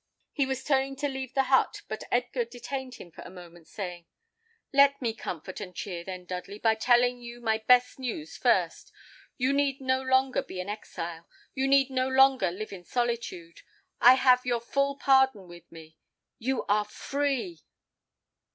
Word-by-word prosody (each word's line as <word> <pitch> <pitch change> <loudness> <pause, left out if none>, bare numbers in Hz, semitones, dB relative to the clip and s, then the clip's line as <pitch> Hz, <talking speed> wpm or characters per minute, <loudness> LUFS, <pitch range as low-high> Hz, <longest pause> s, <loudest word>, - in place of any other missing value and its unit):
He 280 -3 0
was 265 0 -3
turning 270 -1 +1
to 290 +2 -2
leave 265 -2 -6
the 270 -1 +3
but, 265 - +2
but 215 - -6
Edgar 245 0 0
detained 250 +2 -7
him 175 - -12
for - - -12
a - - -10
moment, 175 -2 -14
saying, 175 -4 -7 0.7
"Let 280 0 +5
me 235 -3 -1
comfort 185 -2 -7
and 180 -3 -8
cheer, 175 -3 -5
then, 185 0 -7
Dudley, 185 +3 -6
by 225 +1 +3
telling 245 +2 +2
you 240 0 -9
my 220 -2 0
best 250 +3 +3
news 265 +5 -5
first. - - 0 0.5
You 260 +1 +1
need 280 -1 +1
no 260 -1 0
longer 260 0 +2
be 185 - -8
an 180 +2 -5
exile, 170 -5 -7 0.2
you 270 0 0
need 270 0 +4
no 255 0 0
longer 265 -6 +4
live 200 +4 -7
in 180 -2 -9
solitude; 230 -7 -3 0.4
I 250 +2 +8
have 255 -1 +4
your 245 -1 0
full 275 +4 -1
pardon 265 -8 +3
with 175 0 -14
me. 160 -1 -14 0.4
You 260 +2 -1
are 210 +1 +2
free." 285 - -3
245 Hz, 170 wpm, -28 LUFS, 195-265 Hz, 0.7 s, I